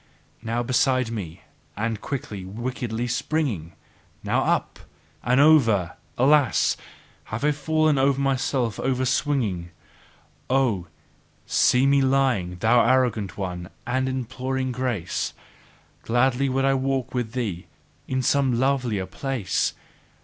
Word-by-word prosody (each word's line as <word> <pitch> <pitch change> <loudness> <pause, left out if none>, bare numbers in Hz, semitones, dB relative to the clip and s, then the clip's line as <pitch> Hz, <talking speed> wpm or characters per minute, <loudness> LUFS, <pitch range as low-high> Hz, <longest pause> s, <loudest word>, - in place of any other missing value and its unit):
Now 115 +2 -2
beside 130 -1 +1
me! 95 -5 -6 0.3
And 110 0 -2
quickly, 130 -9 -5
wickedly 120 +3 -4
springing! 120 - -2 0.5
Now - - +1
up! - - 0 0.4
And 125 +3 +3
over! 115 - +4 0.2
Alas! 140 0 +3 0.6
I 110 - -1
have 150 +4 +1
fallen 145 -3 +2
myself 130 -4 0
overswinging! 130 - 0 0.8
Oh, 125 -9 +1 0.6
see 125 +2 +3
me 140 0 +4
lying, 130 -10 +1
thou 120 +2 +5
arrogant 125 -6 +1
one, 90 -2 -5 0.2
and 130 +1 0
imploring 130 +1 -3
grace! 120 -9 -2 0.7
Gladly 130 +3 +1
would 135 +1 +1
I 135 - +3
walk 130 -1 -1
with 120 -3 -2
thee 105 -9 -3 0.4
in 130 0 -1
some 130 -2 +2
lovelier 125 -7 0
place! 100 - -2
125 Hz, 110 wpm, -24 LUFS, 110-135 Hz, 0.8 s, thou